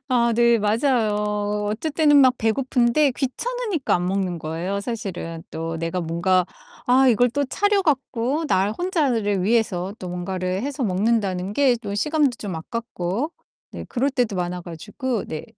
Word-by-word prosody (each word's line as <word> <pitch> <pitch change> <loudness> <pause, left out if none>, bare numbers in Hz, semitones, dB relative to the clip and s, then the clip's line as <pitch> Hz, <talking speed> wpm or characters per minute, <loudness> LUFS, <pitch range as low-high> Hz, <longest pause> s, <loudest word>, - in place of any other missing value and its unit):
아 235 -2 +3
네 235 0 +4
맞아요. 210 -2 0
어쩔 235 +9 -2
때는 295 -2 +4
막 260 -3 +6
배고픈데 250 +4 +2
귀찮으니까 400 - -2
안 180 0 0
먹는 185 -2 -1
거예요, 165 +6 -3
사실은. 195 -7 -5
또 165 0 -4
내가 165 +2 -2
뭔가 175 +2 +1 0.4
아 260 +1 +5
이걸 245 +1 +4
또 285 +4 0
차려 405 +8 +1
갖고 275 0 0
나 195 -4 +2
혼자를 235 - 0
위해서 200 -3 0
또 185 - -6
뭔가를 185 +2 -3
해서 280 0 -3
먹는다는 195 -2 0
게 260 0 +3
또 200 -1 -4
시간도 300 +6 +2
좀 195 -5 -5
아깝고 230 - -3 0.4
네 - - -7
그럴 270 +3 0
때도 245 -6 0
많아 180 0 -3
가지고. 210 - -4
네. 155 - -5
220 Hz, 300 characters per minute, -23 LUFS, 185-260 Hz, 0.4 s, 막